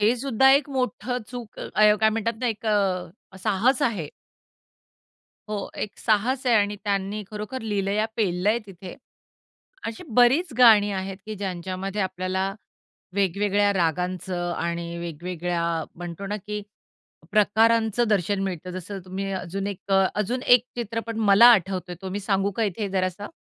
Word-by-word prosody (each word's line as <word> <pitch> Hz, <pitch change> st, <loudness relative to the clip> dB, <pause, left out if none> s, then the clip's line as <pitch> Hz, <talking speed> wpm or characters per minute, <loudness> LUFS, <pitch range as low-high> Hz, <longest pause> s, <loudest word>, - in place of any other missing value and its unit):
हे 215 Hz, +3 st, +4 dB
सुद्धा 265 Hz, +1 st, +3 dB
एक 280 Hz, +1 st, +3 dB
मोठं 250 Hz, -1 st, -2 dB
चूक 245 Hz, -2 st, -8 dB
अ, -, -, -5 dB, 0.3 s
काय 220 Hz, -, +5 dB
म्हणतात 225 Hz, +1 st, -1 dB
ना 250 Hz, -, 0 dB
एक 225 Hz, -1 st, -3 dB
अ, 195 Hz, -1 st, -1 dB
साहस 225 Hz, +6 st, +2 dB
आहे. 190 Hz, -11 st, 0 dB, 1.4 s
हो, 205 Hz, -2 st, -4 dB
एक 210 Hz, -, -5 dB
साहस 240 Hz, +5 st, +1 dB
आहे 240 Hz, -, +4 dB
आणि 205 Hz, 0 st, +1 dB
त्यांनी 200 Hz, +1 st, -1 dB
खरोखर 215 Hz, +5 st, -5 dB
लीलया 205 Hz, 0 st, 0 dB
पेललंय 205 Hz, +2 st, +1 dB
तिथे. 185 Hz, -1 st, -10 dB, 0.9 s
अशी 225 Hz, +9 st, -6 dB
बरीच 265 Hz, +7 st, +4 dB
गाणी 215 Hz, -4 st, +7 dB
आहेत, 190 Hz, 0 st, -4 dB
की 215 Hz, -, -4 dB
ज्यांच्यामध्ये 190 Hz, +1 st, -4 dB
आपल्याला 190 Hz, +1 st, -2 dB, 0.6 s
वेगवेगळ्या 200 Hz, +1 st, +2 dB
रागांचं 180 Hz, 0 st, -1 dB
आणि 170 Hz, 0 st, -3 dB
वेगवेगळ्या 170 Hz, +1 st, -3 dB, 0.3 s
म्हणतो 175 Hz, +2 st, -7 dB
ना, 205 Hz, +2 st, -2 dB
की 210 Hz, +1 st, -6 dB, 0.7 s
प्रकारांचं 225 Hz, +2 st, +3 dB
दर्शन 200 Hz, -1 st, +1 dB
मिळतं. 185 Hz, -2 st, -4 dB
जसं 185 Hz, +2 st, -6 dB
तुम्ही 190 Hz, +1 st, -4 dB
अजून 190 Hz, +1 st, -4 dB
एक 200 Hz, -2 st, -4 dB
अ, 195 Hz, 0 st, +5 dB
अजून 230 Hz, +5 st, -1 dB
एक 245 Hz, -1 st, +6 dB
चित्रपट 230 Hz, -1 st, -4 dB
मला 205 Hz, +5 st, +8 dB
आठवतो 185 Hz, -3 st, 0 dB
तो 190 Hz, -, -5 dB
मी 205 Hz, +2 st, -3 dB
सांगू 195 Hz, 0 st, 0 dB
का 230 Hz, -, +1 dB
इथे 205 Hz, +1 st, -2 dB
जरासा? 185 Hz, +1 st, -2 dB
200 Hz, 145 wpm, -25 LUFS, 185-225 Hz, 1.4 s, मला